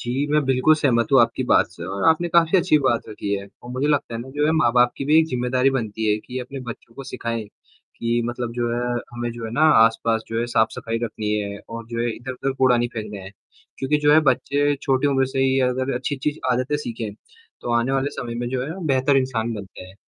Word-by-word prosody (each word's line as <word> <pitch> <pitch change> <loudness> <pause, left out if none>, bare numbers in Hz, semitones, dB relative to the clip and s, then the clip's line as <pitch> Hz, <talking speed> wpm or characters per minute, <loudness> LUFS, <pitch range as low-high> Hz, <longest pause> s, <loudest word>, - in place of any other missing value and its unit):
जी, 130 +4 -1
मैं 150 +1 +4
बिल्कुल 135 +4 +4
सहमत 125 -6 +1
हूँ 135 - +7
आपकी 115 +2 +2
बात - - +5
से 85 - -9
और 95 +1 -3
आपने 160 +2 +2
काफ़ी 170 +2 +4
अच्छी 160 - +3
बात 120 -3 +2
रखी 100 -1 -4
है 100 0 -5 0.2
और 120 - -9
मुझे 130 +3 -1
लगता 145 -5 0
है 115 - -3
ना, 125 - -9
जो 145 +2 -1
है 155 - +2
माँ-बाप 125 -5 +3
की - - -4
भी 150 +3 +5
एक 160 - +4
जिम्मेदारी 125 0 +1
बनती 110 -4 -1
है 105 - +3
कि 125 +3 -7
अपने 130 +2 -7
बच्चों 120 -1 -9
को 135 - -8
सिखाएँ, 115 -3 -4
कि 115 +2 -5
मतलब 120 0 -4
जो 120 0 -1
है 120 - -1 0.3
हमें 120 0 -3
जो 115 -1 -7
है 110 - -5
ना 145 - -1 0.2
आस-पास 115 0 +1
जो 115 - -2
है 120 - 0
साफ-सफाई 115 0 0
रखनी 105 -2 -3
है 100 -1 -3
और 115 0 -7
जो 115 0 -3
है 120 - 0
इधर-उधर 130 +2 -4
कूड़ा 130 -2 +4
नहीं 120 0 0
फेंकना 105 -3 -5
है, 95 - -9 0.5
क्योंकि 135 +3 +1
जो 150 0 +4
है 155 - +7
बच्चे 145 +1 +1
छोटी 135 +1 +1
उम्र 135 -2 +2
से 130 - -5
ही 135 0 +2
अगर 130 +1 -1
अच्छी-अच्छी 145 +4 -2
आदतें 130 +4 0
सीखें, 115 -7 -5 0.5
तो 120 - -3
आने 120 +3 +1
वाले 135 +1 0
समय 120 -4 -6
में 120 0 -3
जो 125 0 -2
है 165 +5 -6
बेहतर 135 0 +3
इंसान 120 -4 0
बनते 100 -3 -9
हैं। 95 - -15
125 Hz, 235 wpm, -22 LUFS, 115-135 Hz, 0.5 s, हूँ